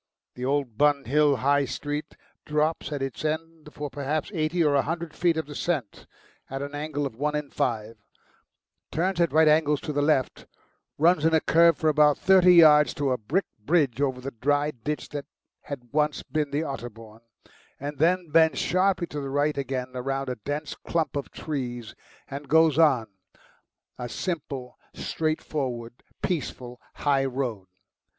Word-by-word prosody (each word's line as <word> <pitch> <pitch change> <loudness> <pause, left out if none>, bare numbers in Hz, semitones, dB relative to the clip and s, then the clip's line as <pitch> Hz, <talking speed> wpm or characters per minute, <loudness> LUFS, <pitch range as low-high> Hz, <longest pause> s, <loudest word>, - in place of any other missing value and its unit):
The 125 - -8
old 135 -5 -1
Bun 145 -2 +3
Hill 145 +3 +3
High 145 0 +4
Street 145 +4 -5 0.3
drops 150 0 -1
at 145 -2 -2
its 135 0 -5
end 160 0 -4
for 150 -1 -5
perhaps 145 +4 -2
eighty 165 +1 +1
or 150 -2 +3
a 140 - +4
hundred 165 +1 -4
feet 170 -1 +1
of 160 - -1
descent 145 - -3 0.4
at 135 +1 -4
an 145 +1 -7
angle 145 0 -3
of 135 - -5
one 150 +4 -1
in 150 -2 -4
five, 115 -1 -2 0.9
turns 175 +2 0
at 170 - +2
right 160 0 +5
angles 150 -1 +3
to 150 - -4
the 145 - +1
left, 145 -3 0 0.5
runs 165 0 +4
in 160 0 +4
a - - +5
curve 165 0 +4
for 160 - 0
about 150 -1 +4
thirty 185 -2 +6
yards 150 -3 +7
to 140 -2 0
a 125 - +1
brick 155 - 0
bridge 140 0 +1
over 130 -3 0
the 135 +2 -6
dry 145 +5 0
ditch 150 +4 -5
that 145 -1 -6 0.4
had 125 -3 -8
once 150 0 +1
been 150 -2 -2
the 145 +3 -1
Otterbourne, 115 -6 -8 0.6
and 145 0 -6
then 175 +1 +2
bends 160 0 +4
sharply 185 0 +1
to 150 -3 -6
the 135 - -5
right 145 +2 +1
again 130 -2 -3
round 135 +1 -3
a 125 - -2
dense 145 +7 -4
clump 165 -3 -2
of 140 - -3
trees 120 -7 -5 0.3
and 140 +1 -8
goes 160 -1 +4
on, 135 -8 +4 0.9
a 120 -1 -4
simple, 140 -8 -5 0.2
straightforward, 130 -7 -3 0.2
peaceful 130 -8 -3
high 140 -2 +1
road. 125 -7 -3
145 Hz, 165 wpm, -26 LUFS, 135-155 Hz, 0.9 s, yards